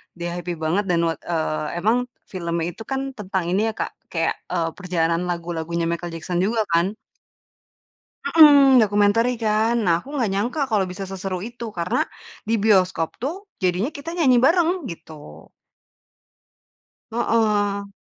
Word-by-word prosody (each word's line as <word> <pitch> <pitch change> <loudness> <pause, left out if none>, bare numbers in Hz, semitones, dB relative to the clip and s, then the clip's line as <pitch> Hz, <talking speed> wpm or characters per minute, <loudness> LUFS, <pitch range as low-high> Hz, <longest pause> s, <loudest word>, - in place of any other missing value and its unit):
dia 175 0 -4
happy 175 0 -4
banget 165 +6 -1
dan 170 -2 +2
wat 165 -2 -1
eee, 160 -2 -1 0.2
emang 245 +4 +2 0.2
filmnya 170 -2 -2
itu 225 - -10
kan 270 0 -2
tentang 190 -2 -2
ini 205 +4 +2
ya, 220 - -2
Kak, - - -3 0.2
kayak, 165 -1 0
eee, 170 -2 -1
perjalanan 175 -2 0
lagu-lagunya 170 -1 -3
Michael 170 0 -4
Jackson 175 +2 -3
juga 220 +4 +1
kan. 175 +5 +2 1.3
Mhm. 285 -5 +7
Documentary 210 +4 +3
kan. 220 +2 +2
Nah 170 -1 +4
aku - - -19
gak 225 - +1
nyangka 235 +10 -1
kalo 210 -3 +3
bisa 195 +1 -6
seseru 190 -1 -4
itu 235 0 -6
karena 170 +1 0 0.5
di 230 - +2
bioskop 185 -6 +3
tuh 285 +8 -2 0.3
jadinya 185 +6 +1
kita 285 +3 -7
nyanyi 260 -7 +4
bareng 330 +4 +4 0.2
gitu. 155 - -11 1.6
Heeh. 210 -3 +1
195 Hz, 145 wpm, -22 LUFS, 170-225 Hz, 1.6 s, Mhm